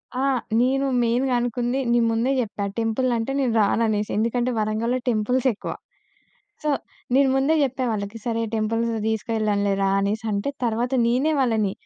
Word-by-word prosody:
ఆ! -, -, -2 dB, 0.4 s
నేను 270 Hz, +2 st, +2 dB, 0.2 s
మెయిన్‌గా 250 Hz, +3 st, +1 dB
అనుకుంది, 245 Hz, +2 st, -1 dB
నేను 235 Hz, -1 st, +3 dB
ముందే 230 Hz, +4 st, +1 dB
చెప్పా 205 Hz, -2 st, -4 dB
టెంపులంటే 230 Hz, +2 st, 0 dB
నేను 250 Hz, -4 st, +1 dB
రాను 225 Hz, +3 st, +2 dB
అనేసి 210 Hz, -1 st, -1 dB
ఎందుకంటే 240 Hz, +3 st, 0 dB
వరంగల్‌లో 220 Hz, +4 st, 0 dB
టెంపుల్స్ 245 Hz, +4 st, +1 dB
ఎక్కువ. -, -, -6 dB, 0.9 s
సో, 300 Hz, -, 0 dB, 0.4 s
నేను 275 Hz, 0 st, +5 dB
ముందే 275 Hz, +4 st, +2 dB
చెప్పా 260 Hz, -1 st, -1 dB
వాళ్ళకి 205 Hz, +1 st, -4 dB
"సరే 230 Hz, -1 st, 0 dB
టెంపుల్స్ 225 Hz, +2 st, 0 dB, 0.2 s
తీసుకెళ్ళనులే 210 Hz, -2 st, 0 dB
రా" 195 Hz, -, +2 dB
అనేసంటే, 210 Hz, +4 st, -1 dB
తరువాత 235 Hz, +3 st, -1 dB
నేనే 260 Hz, +7 st, +2 dB
వాళ్ళని 220 Hz, -6 st, +1 dB
230 Hz, 140 wpm, -23 LUFS, 215-255 Hz, 0.9 s, నేను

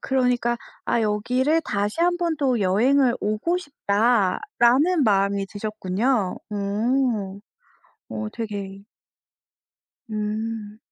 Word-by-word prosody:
그러니까 250 Hz, -2 st, +1 dB, 0.3 s
아 235 Hz, -, +1 dB
'여기를 250 Hz, +9 st, +1 dB
다시 205 Hz, +6 st, -2 dB
한번 345 Hz, -2 st, +1 dB
또 255 Hz, -6 st, +1 dB
여행을 245 Hz, +7 st, +3 dB
오고 215 Hz, -, 0 dB
싶다.'라는 245 Hz, -, +2 dB
마음이 200 Hz, -2 st, +2 dB
드셨군요. 210 Hz, +1 st, -1 dB
오. 210 Hz, 0 st, -1 dB, 0.7 s
어 215 Hz, -, -3 dB
되게 200 Hz, -3 st, -5 dB, 1.3 s
음. 215 Hz, 0 st, -4 dB
220 Hz, 185 characters per minute, -23 LUFS, 205-260 Hz, 1.3 s, 여행을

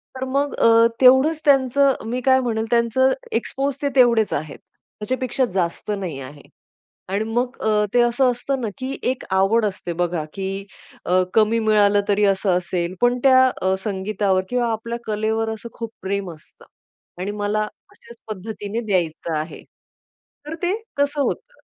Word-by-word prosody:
तर 260 Hz, -, -4 dB
मग 280 Hz, +2 st, 0 dB
अ, 230 Hz, 0 st, +5 dB
तेवढंच 265 Hz, +5 st, +5 dB
त्यांचं 275 Hz, 0 st, +4 dB, 0.2 s
मी 250 Hz, +1 st, -2 dB
काय 260 Hz, +1 st, +4 dB
म्हणेन, 225 Hz, -3 st, -1 dB
त्याचं 240 Hz, +3 st, +3 dB, 0.2 s
एक्सपोज 270 Hz, +4 st, -1 dB
ते 285 Hz, -, +1 dB
तेवढेच 235 Hz, -4 st, +4 dB
आहेत, 145 Hz, 0 st, -4 dB, 0.4 s
त्याच्यापेक्षा 255 Hz, +3 st, -1 dB
जास्त 180 Hz, +2 st, -2 dB
नाही 170 Hz, -8 st, -5 dB
आहे. 145 Hz, +2 st, -11 dB, 0.7 s
आणि 200 Hz, +3 st, 0 dB
मग 245 Hz, +3 st, -1 dB
अ, 210 Hz, -1 st, +2 dB
ते 245 Hz, -, +5 dB
असं 240 Hz, +2 st, +3 dB
असतं 260 Hz, +2 st, -3 dB
ना, 230 Hz, -, -2 dB
की 260 Hz, +1 st, -4 dB
एक 260 Hz, -, -6 dB
आवड 215 Hz, +4 st, +3 dB
असते 190 Hz, -3 st, -4 dB
बघा, 175 Hz, -3 st, -1 dB
की 195 Hz, 0 st, -4 dB, 0.4 s
अ, 185 Hz, +1 st, +3 dB
कमी 220 Hz, +1 st, +4 dB
मिळालं 210 Hz, -2 st, +3 dB
तरी 205 Hz, +1 st, +3 dB
असं 195 Hz, 0 st, +1 dB
असेल, 180 Hz, 0 st, -3 dB
पण 245 Hz, 0 st, +3 dB
त्या 260 Hz, -1 st, +6 dB, 0.2 s
अ, 190 Hz, +1 st, +2 dB
संगीतावर 195 Hz, -1 st, 0 dB
किंवा 245 Hz, -2 st, 0 dB
आपल्या 230 Hz, +2 st, -4 dB
कलेवर 220 Hz, +1 st, -1 dB
असं 220 Hz, +2 st, -9 dB
खूप 230 Hz, -2 st, -5 dB
प्रेम 195 Hz, -1 st, -3 dB
असतं. 155 Hz, -, -19 dB, 0.5 s
आणि 195 Hz, +3 st, -3 dB
मला 210 Hz, +1 st, 0 dB, 0.3 s
अशाच 235 Hz, 0 st, -16 dB
पद्धतीने 215 Hz, +2 st, -5 dB
द्यायचं 165 Hz, -4 st, -1 dB
आहे. 155 Hz, +2 st, -6 dB, 0.9 s
तर 320 Hz, -, -4 dB
ते 355 Hz, +3 st, +1 dB, 0.2 s
कसं 285 Hz, 0 st, +1 dB
होतं. -, -, -3 dB
220 Hz, 155 wpm, -21 LUFS, 195-255 Hz, 0.9 s, त्या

